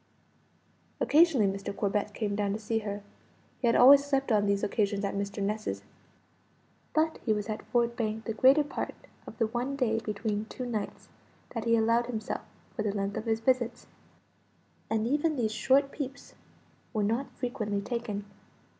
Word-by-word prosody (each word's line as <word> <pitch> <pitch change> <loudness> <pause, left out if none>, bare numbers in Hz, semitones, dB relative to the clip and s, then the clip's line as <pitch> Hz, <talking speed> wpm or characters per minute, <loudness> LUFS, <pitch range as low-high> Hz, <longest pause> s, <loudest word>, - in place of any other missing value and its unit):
Occasionally 305 -7 +5
Mr. 195 0 -3
Corbet 205 +1 -1
came 205 -3 -1
down 200 -1 0
to - - -1
see 225 +1 -1
her. 205 -1 -5 0.6
He 245 - +2
always 275 +4 +8
slept 275 -2 0
on 205 -2 +3
these 200 0 +1
occasions 205 -1 0
at 200 - -2
Mr. 200 0 -3
Ness's; 215 +2 -2 1.1
but 315 +1 +2
he 220 - +2
was 210 0 -3
at 215 - -3
Ford 235 -1 +1
Bank 220 -1 -2
the 225 - -2
greater 265 +6 +5
part 290 - -4 0.3
of - - -9
the 230 - +2
one 245 +5 -2
day 230 -5 +1
between 210 -1 -2
two 250 +3 -6
nights 220 -4 -4 0.5
that 230 -2 -3
he 230 0 +4
allowed 230 +1 +3
himself 220 -3 -3 0.3
for 225 - -2
the 210 -1 -1
length 200 0 -2
of 220 - -4
his 225 0 0
visits. 240 -1 +1 1.0
And 220 0 +1
even 295 +5 +1
these 220 -5 0
short 270 +5 +3
peeps 280 -2 -6 0.6
were 215 -2 +1
not 230 +6 0
frequently 225 -5 -2
taken. 210 -2 -4
225 Hz, 165 wpm, -29 LUFS, 210-250 Hz, 1.1 s, always